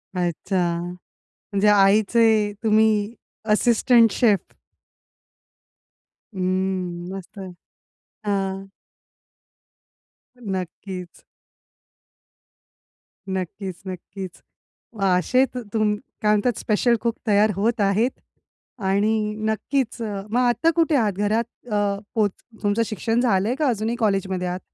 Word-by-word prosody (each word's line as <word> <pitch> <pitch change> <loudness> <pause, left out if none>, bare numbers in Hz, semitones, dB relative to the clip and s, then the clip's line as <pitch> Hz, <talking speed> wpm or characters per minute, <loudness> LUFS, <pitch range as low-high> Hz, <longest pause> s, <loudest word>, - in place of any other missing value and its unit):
अच्छा. 175 0 -1 0.7
म्हणजे 200 +1 +3
आईचे 210 +1 +4
तुम्ही 220 0 +3 0.4
असिस्टंट 230 0 +4
शेफ. 210 -5 +1 1.8
हं. 185 -2 -2
मस्तच. 190 0 -8 0.7
हां. 195 -1 -2 1.7
नक्कीच. 185 -3 -6 2.1
नक्कीच, 190 0 -4
नक्कीच. 185 0 -8 0.5
मग 205 - -4
असे 255 +9 +3
तु 250 - -4
तुम 215 -1 +2 0.3
काय 210 - +3
म्हणतात? 210 +3 +1
स्पेशल 235 +3 +2
कूक 235 0 0
तयार 210 0 +4
होत 220 +4 0
आहेत 205 +5 +2 0.7
आणि 210 +2 +1
नक्कीच, 230 +3 -1
अ, 205 -3 -3
मग 235 +4 +1
आता 245 +6 +3
कुठे 325 -2 +3
आहात? 215 -6 +2
घरात 210 +3 +1 0.3
अ, 210 - +1 0.4
पोच 210 -3 +2 0.3
तुमचं 205 +3 +2
शिक्षण 225 +2 -1
झालंय 220 -1 +2
का, 300 +1 0
अजूनही 225 0 -1
कॉलेजमध्ये 195 -5 0
आहात? 180 +1 -3
210 Hz, 95 wpm, -23 LUFS, 190-225 Hz, 2.1 s, आईचे